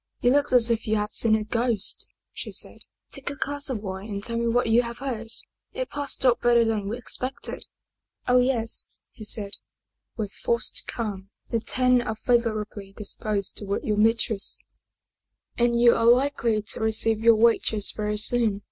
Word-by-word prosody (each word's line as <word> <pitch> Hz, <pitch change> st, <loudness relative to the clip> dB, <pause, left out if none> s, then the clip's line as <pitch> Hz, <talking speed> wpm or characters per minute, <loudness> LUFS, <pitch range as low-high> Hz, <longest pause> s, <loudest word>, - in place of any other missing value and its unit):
" -, -, -48 dB
You 245 Hz, -, +5 dB
look 285 Hz, +1 st, +2 dB
as 240 Hz, -2 st, +5 dB
if 225 Hz, -1 st, -1 dB
you 215 Hz, -, +2 dB
had 210 Hz, 0 st, -2 dB
seen 220 Hz, -2 st, +3 dB
a 215 Hz, -, -1 dB
ghost," 230 Hz, -1 st, -1 dB, 0.3 s
she -, -, -7 dB
said. -, -, -4 dB
" -, -, -41 dB
Take -, -, -6 dB
a 285 Hz, -, -5 dB
glass 285 Hz, +1 st, -2 dB
of 225 Hz, -5 st, -3 dB
wine 190 Hz, +1 st, -6 dB
and 200 Hz, -1 st, -4 dB
tell 235 Hz, -, -2 dB
me 235 Hz, 0 st, 0 dB
what 245 Hz, +2 st, +2 dB
you 230 Hz, +1 st, +4 dB
have 235 Hz, -1 st, -6 dB
heard. 245 Hz, -4 st, -4 dB, 0.5 s
It -, -, -4 dB
passed 285 Hz, -2 st, -1 dB
off 245 Hz, -2 st, +4 dB
better 240 Hz, -1 st, +4 dB
than 215 Hz, -3 st, -1 dB
we 230 Hz, -, -3 dB
ex 245 Hz, -, -4 dB
pected." 260 Hz, +1 st, -4 dB, 0.3 s
" -, -, -40 dB
Oh, 250 Hz, 0 st, +5 dB
yes," 245 Hz, -3 st, -1 dB, 0.2 s
he 220 Hz, -, -11 dB
said, 210 Hz, -1 st, -2 dB, 0.7 s
with 210 Hz, -3 st, -3 dB
forced 235 Hz, 0 st, -1 dB
calm. 200 Hz, -4 st, -5 dB
" -, -, -43 dB
The 230 Hz, -, +1 dB
Ten 250 Hz, +2 st, +2 dB
are 220 Hz, -2 st, -3 dB
favorably 215 Hz, -4 st, -1 dB
disposed 205 Hz, -1 st, -2 dB
toward 200 Hz, -1 st, -2 dB
your 210 Hz, -1 st, -1 dB
mistress, 220 Hz, -1 st, +1 dB, 1.0 s
and 235 Hz, 0 st, +2 dB
you 235 Hz, 0 st, +7 dB
are 230 Hz, -, +1 dB
likely 240 Hz, -3 st, +3 dB
to -, -, -4 dB
receive 220 Hz, 0 st, +2 dB
your 230 Hz, 0 st, +6 dB
wages 220 Hz, -2 st, +3 dB
very 210 Hz, 0 st, -2 dB
soon. 220 Hz, -1 st, +2 dB
230 Hz, 190 wpm, -25 LUFS, 215-245 Hz, 1.0 s, you